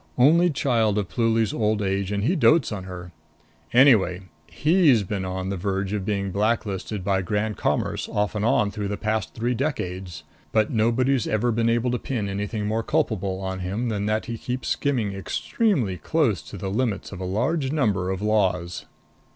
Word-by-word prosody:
Only 165 +7 +5
child 115 -8 +1
of 100 -3 -1
Pluly's 115 -3 +1
old 110 -1 +1
age, 100 -1 -1
and 100 0 -1
he 165 - +2
dotes 155 -3 +4
on 100 -3 -5
her. 90 -1 -8 0.6
Anyway, 115 -9 +5 0.3
he's 150 - +3
been 95 0 -3
on 95 0 -3
the 100 - -2
verge 95 +1 -2
of 100 -3 -2
being 100 -2 -1
black 105 +5 +1
listed 100 0 -4
by 95 -1 +1
Grand 105 +3 -1
Commerce - - -1
off 105 0 -1
and 105 -1 -2
on 105 -2 +2
through 105 -1 -4
the 100 0 -3
past 110 -1 -2
three 120 +2 0
decades. 95 - -3 0.3
But 110 -1 +2
nobody's 120 +3 +2
ever 115 +3 +1
been 115 +1 +1
able 120 +1 +1
to 125 - -1
pin 115 -7 -3
anything 105 +2 -3
more 110 +2 0
culpable 110 - -1
on 95 0 -4
him 100 +7 -2
than 105 -2 -2
that 110 0 0
he 115 -2 -5
keeps 125 +1 -4
skimming 120 -9 0
extremely 115 - -1
close 120 - +1
to 100 - -8
the 95 +1 -4
limits 110 -1 -1
of 95 - -7
a - - -3
large 130 - 0
number 105 -12 +1
of 95 +1 -3
laws." 95 -5 0
105 Hz, 185 wpm, -24 LUFS, 95-120 Hz, 0.6 s, Only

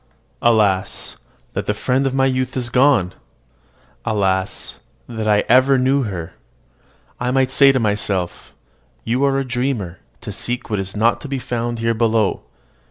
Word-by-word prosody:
Alas, 105 -5 +2 0.4
that - - -4
the - - 0
friend 135 +2 0
of 135 - -2
my 135 0 +3
youth 130 -1 -1
is 120 -2 -1
gone! 125 -9 +3 0.9
Alas, 95 -3 -1 0.3
that 110 -2 -4
I 105 -1 +3
ever 130 +3 +5
knew 130 +2 +2
her! 90 -6 -6 0.9
I 125 - -1
might 130 0 +1
say 140 0 +6
to 130 - +1
myself, 105 -5 -2 0.5
"You 125 +4 0
are 135 -1 +2
a 135 - -1
dreamer 120 -8 -2 0.2
to - - -6
seek 120 -1 -4
what 105 - 0
is 95 +1 -5
not 115 +2 +2
to - - -7
be 135 -1 -3
found 120 -1 -3
here 115 0 0
below." 110 -2 +1
120 Hz, 160 wpm, -19 LUFS, 105-130 Hz, 0.9 s, say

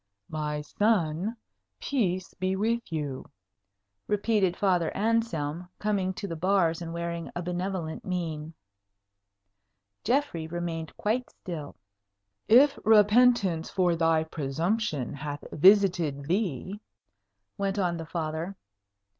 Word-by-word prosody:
"My 150 -1 -2
son, 195 +3 0 0.4
peace 185 -9 -1
be 185 +1 -1
with 230 +1 -1
you!" 145 -5 -3 0.8
repeated 205 -3 +1
Father 180 -5 +2
Anselm, 180 -7 0
coming 200 -3 0
to 200 - -5
the 165 - -4
bars 170 -1 +2
and 165 -1 -5
wearing 170 0 -4
a 175 - -3
benevolent 180 -2 -3
mien. 165 -4 -4 1.5
Geoffrey 240 - 0
remained 165 -1 -4
quite 240 +4 -1
still. 155 -5 -7 0.7
"If 270 +6 +6
repentance 210 -5 +4
for 180 -3 +2
thy 165 -1 +3
presumption 160 - -2
hath 145 0 -6
visited 175 -5 +4
thee 185 - -2 0.4
" 100 0 -53
went 195 0 -1
on 175 -3 0
the 165 -1 -7
Father. 165 +3 -3
175 Hz, 110 wpm, -28 LUFS, 160-200 Hz, 1.5 s, If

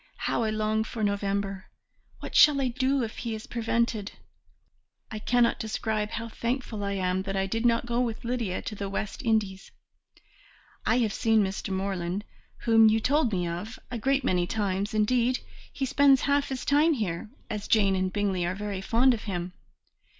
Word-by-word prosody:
How - - -1
I 220 - +1
long 215 0 0
for 220 0 -5
November! 200 -1 -1 0.6
What - - -7
shall 295 -2 +7
I 260 -2 +1
do 260 +1 +1
if 225 - -5
he 230 -2 -3
is 215 - -8
prevented? 230 -3 -1 1.0
I 215 - -4
cannot 240 +2 +2
describe 215 -1 -2
how 230 +1 -4
thankful 230 -2 -3
I 200 0 -1
am 185 -1 0
that 195 0 -4
I 195 0 +1
did 225 +4 0
not 230 0 +2
go 240 0 -1
with 235 -1 -2
Lydia 235 -6 -2
to - - -5
the 200 -1 -4
West 200 +1 -4
Indies. 215 -5 0 1.2
I 225 - +4
have 225 -5 +1
seen 225 -2 +3
Mr. 195 +1 -3
Morland, 190 0 -2 0.4
whom 225 -1 +6
you 220 +1 +3
told 280 +1 +2
me 180 -3 -1
of, 175 +7 -5
a 240 - -3
great 275 +4 +1
many 180 -1 +1
times; 205 +1 -1
indeed, 245 +4 +2 0.3
he 270 - -2
spends 275 0 +4
half 280 0 +1
his 265 -2 -4
time 300 +3 +4
here, 210 - -3 0.2
as 210 -1 -5
Jane 200 -3 +3
and 185 0 0
Bingley 195 -3 0
are 175 +2 -1
very 200 -1 -4
fond 240 +6 +3
of 225 - -5
him. 180 -3 -4
215 Hz, 180 wpm, -27 LUFS, 195-240 Hz, 1.2 s, shall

